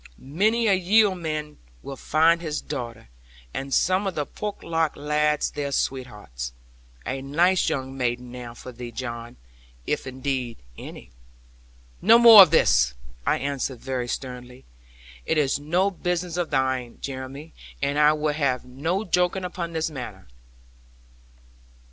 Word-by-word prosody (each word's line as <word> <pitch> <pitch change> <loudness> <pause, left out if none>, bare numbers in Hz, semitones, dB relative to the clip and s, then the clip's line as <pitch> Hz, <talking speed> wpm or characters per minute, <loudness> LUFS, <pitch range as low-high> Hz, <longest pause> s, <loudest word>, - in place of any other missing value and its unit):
Many 215 - +1
a 205 - +4
yeoman 175 -6 +1 0.2
will 135 - -6
find 165 +5 +3
his 155 -3 -3
daughter, 120 - -6 0.4
and 135 0 -5
some 185 +7 +2
of 190 - -3
the 150 - -1
Porlock 165 -4 -2
lads 150 0 0
their 140 -1 -3
sweethearts. 105 - -3 0.5
A 135 +1 -3
nice 170 +7 +2
young 135 -1 -3
maiden, 125 -1 -2
now, 120 -1 -8
for 125 - -10
thee, 120 0 -8
John; 120 -1 -6 0.5
if - - -2
indeed, 130 -2 -3 0.2
any - - -10 0.5
' - - -29
'No 220 +5 +7
more 230 -3 +11
of 185 - +8
this!' 60 - +3 0.3
I - - +3
answered 140 -3 -3
very 130 -2 -3
sternly: 125 0 -7 0.6
'it - - +1
is 140 -2 +2
no 175 +7 +1
business 180 -1 -2
of 175 -2 -1
thine, 130 -2 -1
Jeremy; 135 +3 -7 0.3
and 140 +1 0
I 150 0 +6
will 150 -1 -1
have 135 -5 0
no 160 +11 -2
joking 180 +1 +1
upon 175 -2 -5
this 160 0 -1
matter.' 130 - -8
145 Hz, 140 wpm, -24 LUFS, 125-170 Hz, 0.6 s, more